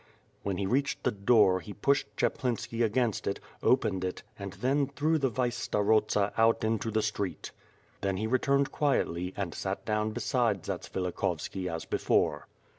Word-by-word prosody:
When 100 -2 -2
he 100 - -1
reached 135 +7 0
the 125 - +2
door, 100 -3 +4
he 100 +3 -9
pushed 140 +6 +2
Chaplinski 120 -3 -1
against 115 -1 0
it, - - -1 0.2
opened 95 -1 +2
it, 90 0 -3 0.2
and 100 -1 -6
then 135 +2 +1
threw 150 +3 +1
the 135 -2 +2
vice 120 0 -1
starosta 105 -1 +2
out 115 0 +4
into 110 0 0
the 110 0 +1
street. 100 -5 -3 0.5
Then 95 -1 0
he 110 - -1
returned 140 +4 +2
quietly 90 - 0
and 95 -5 -2
sat - - -4
down 105 0 0
beside 110 -3 0
Zatsvilik 90 -2 -4
hovski 90 -1 -2
as 85 0 -4
before. - - +1
110 Hz, 160 wpm, -30 LUFS, 100-125 Hz, 0.5 s, door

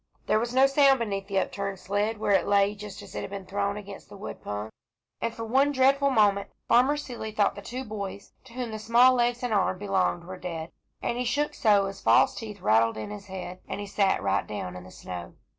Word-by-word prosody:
There 215 - +3
was 235 +1 -2
no 260 +2 +5
sound 275 0 +5
beneath 200 -4 -3
the 195 -1 -2
upturned 195 0 -2
sled, 205 +4 -1
where 210 -1 0
it 190 -3 +3
lay 200 0 +3
just 210 -1 -9
as - - -12
it - - -3
had - - -6
been 195 -1 -7
thrown 200 +1 -1
against 200 -1 -10
the 205 - -11
wood 200 - -8
pung, 105 +1 -5 0.5
and 230 - 0
for 230 0 -6
one 270 +5 +3
dreadful 275 +1 +3
moment 205 -5 +3 0.2
Farmer 260 +5 +4
Seeley 240 -6 -6
thought 210 -1 +2
the 200 - -9
two 250 +5 -5
boys 200 -3 -6
to 245 - -15
whom 245 -2 -4
the 215 - -5
small 235 +4 +5
legs 245 0 +1
and 245 -3 0
arms 190 -2 +2
belonged 190 -3 0
were 185 +1 -8
dead, 170 -2 -6 0.3
and 240 - -1
he - - +1
shook 285 +5 0
so 205 -3 +3
his 195 0 -6
false - - +5
teeth 210 -4 -8
rattled 115 -1 +3
in 110 - -5
his 205 -1 -8
head, 185 -1 -7
and - - -4
he 205 - -4
sat 195 - +1
right 100 0 +1
down 90 -4 -5
in 90 0 -9
the - - -12
snow. 90 -2 -8
205 Hz, 235 wpm, -27 LUFS, 190-240 Hz, 0.5 s, no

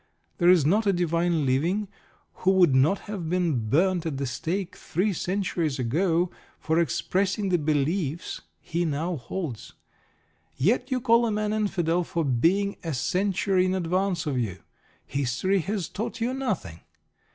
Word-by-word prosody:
There 175 -1 +5
is 175 -6 +5
not 205 +7 +2
a 200 - +4
divine 170 -2 +1
living 170 +11 +1 0.5
who 185 - +3
would 180 -7 +5
not 145 +9 +3
have 195 -6 -5
been 165 -11 0
burned 175 - +2
at 145 -4 -3
the 140 - -2
stake 175 +9 -3
three 195 +5 -1
centuries 175 -5 -1
ago 165 +8 +1 0.3
for 160 +1 +1
expressing 195 +4 0
the 175 -2 +2
beliefs 155 +2 -1 0.2
he 170 +1 -2
now 165 +2 -1
holds. 130 - -6 0.8
Yet 200 - +1
you 255 -2 0
call 235 0 +4
a - - -1
man 210 0 -1
Infidel 180 -5 0
for 165 -1 -2
being 175 +11 +1
a 165 -4 -2
century 190 +5 +1
in 185 0 0
advance 185 0 0
of 140 -4 -1
you. 95 -6 -4 0.4
History 140 +9 0
has 195 0 -2
taught 220 +3 -5
you 235 +3 0
nothing. 200 - -3
175 Hz, 150 wpm, -26 LUFS, 150-195 Hz, 0.8 s, There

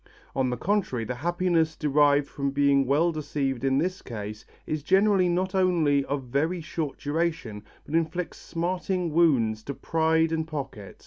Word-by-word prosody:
On 130 -1 +1
the 125 - -2
contrary, 175 - -1
the 125 - -3
happiness 165 +2 0
derived 145 -1 +3
from 140 -1 -2
being 140 -1 +3
well 155 +6 +3
deceived 140 -5 -2
in 135 0 +2
this 185 +5 -1
case 105 -2 -7 0.2
is 155 -1 -2
generally 190 +2 +3
not 185 +2 0
only 170 -7 +3
of 140 -1 -2
very 145 +8 -1
short 155 -2 -4
duration 145 -9 -2 0.2
but 145 - -9
inflicts 165 +2 -1
smarting 180 0 -2
wounds 125 -10 +3
to 140 - -5
pride 160 +1 +1
and 160 -1 -1
pocket. 135 - -7
155 Hz, 155 wpm, -26 LUFS, 135-170 Hz, 0.2 s, derived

